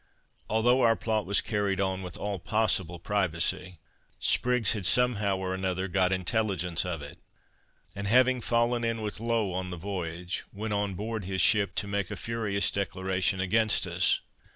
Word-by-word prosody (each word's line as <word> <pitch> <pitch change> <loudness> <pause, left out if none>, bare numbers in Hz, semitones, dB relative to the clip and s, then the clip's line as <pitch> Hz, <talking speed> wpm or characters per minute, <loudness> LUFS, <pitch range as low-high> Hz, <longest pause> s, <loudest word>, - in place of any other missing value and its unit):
Although 120 +4 +3
our 115 -2 +4
plot 110 -2 -2
was 100 - +3
carried 100 -3 -1
on 95 -1 -1
with 90 -2 -7
all 100 -2 -3
possible 95 -3 0
privacy, 90 -1 -1 0.4
Spriggs 125 -4 +2
had 100 -5 0
somehow 105 -5 +2
or 95 0 -3
other 95 0 -2
got 95 0 +2
intelligence 95 -3 0
of 80 -5 -4
it; 70 - -10 0.8
and 100 0 -4
having 130 +3 +4
fallen 120 +1 +1
in 115 -1 -1
with 105 0 -4
Low 115 -3 0
on 90 0 -3
the 90 - -6
voyage, 90 -1 -4
went 105 +1 -4
on 100 -2 -1
board 110 0 -4
his 95 0 -3
ship 100 +2 +4
to 100 - -1
make 100 -2 -2
a - - -4
furious 110 -4 0
declaration 95 -1 -1
against 110 +3 +2
us. 90 +1 +2
100 Hz, 165 wpm, -28 LUFS, 95-110 Hz, 0.8 s, our